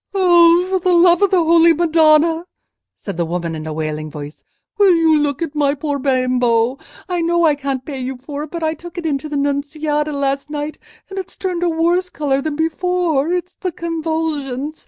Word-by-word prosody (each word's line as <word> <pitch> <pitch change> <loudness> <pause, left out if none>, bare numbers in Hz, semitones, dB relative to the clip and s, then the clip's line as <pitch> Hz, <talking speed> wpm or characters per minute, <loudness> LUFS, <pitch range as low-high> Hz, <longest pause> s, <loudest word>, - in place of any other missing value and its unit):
"Oh, 345 -2 +5
for 375 0 0
the 360 0 +2
love 345 +1 +5
of 400 - +4
the 360 -2 +3
Holy 335 +1 +5
Madonna!" 325 0 +3 0.5
said 200 -5 -7
the 170 - +1
woman, 170 0 -3
in 155 0 -6
a - - -4
wailing 155 0 -4
voice; 150 0 -9 0.4
"will 390 -3 +6
you 325 -1 +3
look 295 0 0
at 310 -3 -5
my 290 -1 +1
poor 285 0 -3
bimbo? 255 -2 +1 0.3
I 355 -2 -1
know 340 0 +2
I 305 - +4
can't 275 -2 -4
pay 275 -2 -6
you 260 0 -4
for 285 +3 -7
it, 305 - -6
but 335 0 -5
I 315 0 +1
took 345 +2 -12
it 345 - -5
into 300 0 -2
the 295 - -2
Nunziata 295 +2 -1
last 275 0 -2
night, 295 0 -5 0.3
and 390 - -4
it's 365 -1 -8
turned 365 -3 -3
a 350 - +1
worse 340 +3 +1
colour 280 -5 -1
than 305 0 -3
before; 325 -1 0
it's 360 +1 -2
the 365 - -4
convulsions. 315 -4 -3
310 Hz, 200 wpm, -18 LUFS, 275-340 Hz, 0.5 s, will